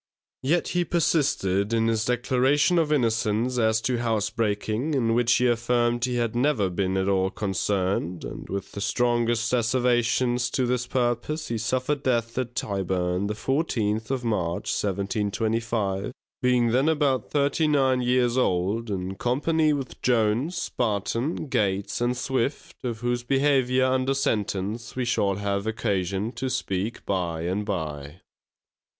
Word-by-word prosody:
Yet 165 +6 +1
he 175 0 +1
persisted 125 - +1
in 115 -1 +2
his 110 -1 +1
declaration 130 +7 +2
of 155 -2 +1
innocence 115 -2 +1
as 110 -1 +3
to 125 0 0
housebreaking, 110 +4 -1
in 115 -4 +2
which 120 +1 +3
he 125 - +3
affirmed 120 0 +1
he 125 -1 -2
had 120 -1 -1
never 120 -7 +1
been 95 +1 -1
at 95 0 0
all 95 -1 +2
concerned; 95 -3 -1
and - - -8
with 100 0 -4
the 100 - -6
strongest 120 +1 +1
asservations 120 0 +2
to 130 - +1
this 125 0 -1
purpose, 125 +5 -1
he 115 -1 -2
suffered 130 +5 -1
death 115 -3 0
at 125 -1 -4
Tyburn, 95 -1 -1
the 105 - -3
fourteenth 110 -5 -1
of 130 -2 -1
March, 90 -7 -1
1725, 105 +1 -1 0.3
being 125 -2 +3
then 130 +6 +3
about 145 -6 +1
thirty 145 +2 +1
nine 135 -4 +3
years 125 0 +2
old, 100 +2 0
in 95 -1 -3
company 150 +8 +1
with 140 -3 -4
Jones, 125 +9 +1
Barton, 115 - -1
Gates 100 -3 -1
and 120 +1 +1
Swift, 130 +2 -3
of 115 -3 -4
whose 120 0 0
behaviour 130 0 +2
under 130 +1 +1
sentence 105 -3 -2
we 125 -1 -1
shall 100 -4 +1
have 100 +1 -2
occasion 100 -1 -1
to 130 +1 -3
speak 100 -1 -3
by 85 -4 -1
and 95 +4 -1
by. 80 -6 -5
115 Hz, 145 wpm, -25 LUFS, 100-130 Hz, 0.3 s, as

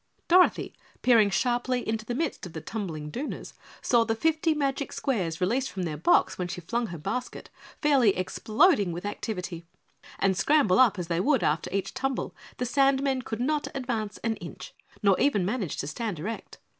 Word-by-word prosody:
Dorothy, 360 +1 +4 0.3
peering 230 -5 +5
sharply 245 +5 0
into 220 0 -2
the 240 - -3
midst 300 - -2
of 170 - -13
the 160 - -5
tumbling 160 -8 -5
Dooners, 275 - -5 0.3
saw 235 -2 +4
the 225 0 -1
fifty 320 +4 +1
magic 280 -1 -1
squares 180 - -2
released 245 +9 0
from 190 - -4
their 160 -3 -3
box 155 - +2
when 180 - -1
she 175 - -5
flung 235 +7 -2
her 170 - -7
basket, 250 +11 -5 0.3
fairly 265 -10 +4
exploding 215 - +2
with 175 +3 -6
activity, 180 -5 -4 0.5
and 195 -1 +2
scramble 255 - +3
up 235 -6 +5
as 180 - -3
they 170 0 -1
would 265 +6 +2
after 150 +1 0
each 195 0 -2
tumble, 265 0 -2 0.2
the 250 - -1
sandmen 270 +1 +2
could 225 0 -4
not 295 +3 0
advance 230 -6 -3
an 225 -1 0
inch, - - -9 0.3
nor 195 -2 +4
even 210 -10 +2
manage 200 - -2
to - - -3
stand 205 +5 -4
erect. 215 +9 -6
225 Hz, 180 wpm, -27 LUFS, 185-265 Hz, 0.5 s, peering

